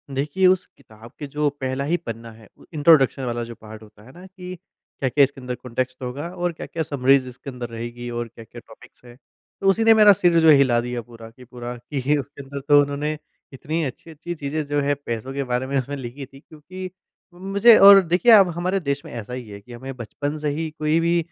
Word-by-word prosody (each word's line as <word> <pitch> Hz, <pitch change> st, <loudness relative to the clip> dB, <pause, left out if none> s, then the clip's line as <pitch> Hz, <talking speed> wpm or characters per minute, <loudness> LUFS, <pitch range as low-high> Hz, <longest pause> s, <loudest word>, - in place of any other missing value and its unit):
देखिए, 150 Hz, +7 st, 0 dB
उस 185 Hz, 0 st, +2 dB
किताब 115 Hz, -3 st, -16 dB
के 145 Hz, -, -6 dB
जो 150 Hz, +1 st, 0 dB
पहला 130 Hz, +1 st, -2 dB
ही 170 Hz, +4 st, +1 dB
पन्ना 115 Hz, -6 st, -8 dB
है 110 Hz, -2 st, -17 dB
उ, -, -, -19 dB
इंट्रोडक्शन 145 Hz, -3 st, +4 dB
वाला 120 Hz, -1 st, -3 dB
जो 115 Hz, 0 st, -9 dB
पार्ट 110 Hz, 0 st, -12 dB
होता 105 Hz, 0 st, -18 dB
है 130 Hz, -, -15 dB
न 185 Hz, -, -12 dB
कि 185 Hz, -1 st, -9 dB, 0.4 s
क्या-क्या 140 Hz, +2 st, +3 dB
इसके 135 Hz, -1 st, -1 dB
अंदर 125 Hz, 0 st, -5 dB
कॉन्टेक्स्ट 130 Hz, +1 st, -5 dB
होगा 140 Hz, +7 st, -5 dB
और 175 Hz, 0 st, -1 dB
क्या-क्या 160 Hz, 0 st, -5 dB
समरीज़ 135 Hz, -2 st, +2 dB
इसके 125 Hz, +3 st, -10 dB
अंदर 125 Hz, -2 st, -7 dB
रहेगी 120 Hz, +1 st, -7 dB
और 120 Hz, 0 st, -4 dB
क्या-क्या 115 Hz, +1 st, -13 dB
टॉपिक्स 110 Hz, +2 st, -18 dB
हैं। 120 Hz, 0 st, -14 dB, 0.5 s
तो 195 Hz, -, 0 dB
उसी 225 Hz, +4 st, +2 dB
ने 225 Hz, 0 st, +7 dB
मेरा 210 Hz, -2 st, +7 dB
सिर 175 Hz, -2 st, +3 dB
जो 160 Hz, -1 st, +5 dB
हिला 135 Hz, -5 st, +5 dB
दिया 120 Hz, 0 st, -4 dB
पूरा 115 Hz, -1 st, -13 dB
कि 125 Hz, +3 st, -17 dB
पूरा 125 Hz, 0 st, -8 dB
कि 140 Hz, +3 st, -1 dB
उसके 140 Hz, +1 st, -7 dB
अंदर 140 Hz, +1 st, -7 dB
तो 145 Hz, 0 st, +7 dB
उन्होंने 145 Hz, +2 st, -2 dB, 0.4 s
इतनी 155 Hz, +5 st, -3 dB
अच्छी-अच्छी 155 Hz, +5 st, -7 dB
चीजें 150 Hz, 0 st, -4 dB
जो 145 Hz, 0 st, -1 dB
हैं 145 Hz, +1 st, 0 dB
पैसों 120 Hz, +3 st, -4 dB
के 140 Hz, 0 st, -2 dB
बारे 125 Hz, +2 st, -1 dB
में 140 Hz, 0 st, -1 dB
उसमें 140 Hz, +3 st, -5 dB
लिखी 130 Hz, +2 st, -8 dB
थीं। 135 Hz, +1 st, -17 dB
क्योंकि 185 Hz, +4 st, -10 dB, 0.4 s
मुझे 200 Hz, +5 st, +5 dB
और 195 Hz, 0 st, +9 dB
देखिए, 180 Hz, +7 st, +3 dB
अब 195 Hz, -4 st, +7 dB
हमारे 180 Hz, +3 st, -1 dB
देश 140 Hz, -3 st, -3 dB
में -, -, -10 dB
ऐसा 115 Hz, +1 st, -7 dB
ही 125 Hz, -4 st, -7 dB
है 100 Hz, 0 st, -9 dB
कि 120 Hz, +4 st, -14 dB
हमें 130 Hz, +2 st, -8 dB
बचपन 145 Hz, +6 st, -5 dB
से 150 Hz, -1 st, -1 dB
ही 160 Hz, +2 st, -3 dB
कोई 155 Hz, +2 st, +1 dB
भी 170 Hz, +1 st, +1 dB
140 Hz, 220 wpm, -22 LUFS, 120-160 Hz, 0.5 s, और